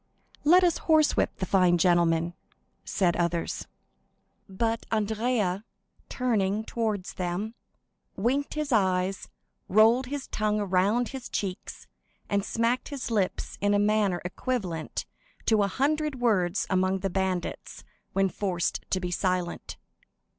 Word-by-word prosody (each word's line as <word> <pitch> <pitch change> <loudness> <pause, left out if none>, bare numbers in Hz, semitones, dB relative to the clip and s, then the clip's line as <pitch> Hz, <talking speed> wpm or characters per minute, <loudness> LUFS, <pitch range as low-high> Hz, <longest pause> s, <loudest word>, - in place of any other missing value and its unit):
"Let 355 +5 +6
us 345 -2 +2
horsewhip 310 -2 +3
the 185 - -2
fine 180 -2 +4
gentleman!" 170 -1 +3 0.5
said 180 -4 +1
others. 170 -1 -1 0.8
But 225 +4 -1
Andrea, 215 -2 0 0.5
turning 215 -4 0
towards 215 -5 -2
them, 185 +5 -3 0.6
winked 265 +10 0
his 305 -2 -2
eyes, 190 -3 +1 0.4
rolled 225 +6 +5
his 280 0 -4
tongue 215 0 -1
around 205 +5 +1
his 265 -2 -7
cheeks, 190 -2 -4 0.5
and 200 -1 +2
smacked 230 +4 0
his 275 -4 -5
lips 200 -5 -1
in 205 0 +3
a - - +4
manner 205 -3 +2
equivalent 180 -5 -3 0.4
to 220 -2 +4
a 200 - +3
hundred 290 +4 0
words 200 -6 +1
among 185 0 +1
the 195 - -1
bandits 190 -1 -3 0.3
when 195 0 +3
forced 185 -2 -2
to 185 - +1
be 180 -1 -3
silent. 180 -1 -2
205 Hz, 125 wpm, -27 LUFS, 185-235 Hz, 0.8 s, Let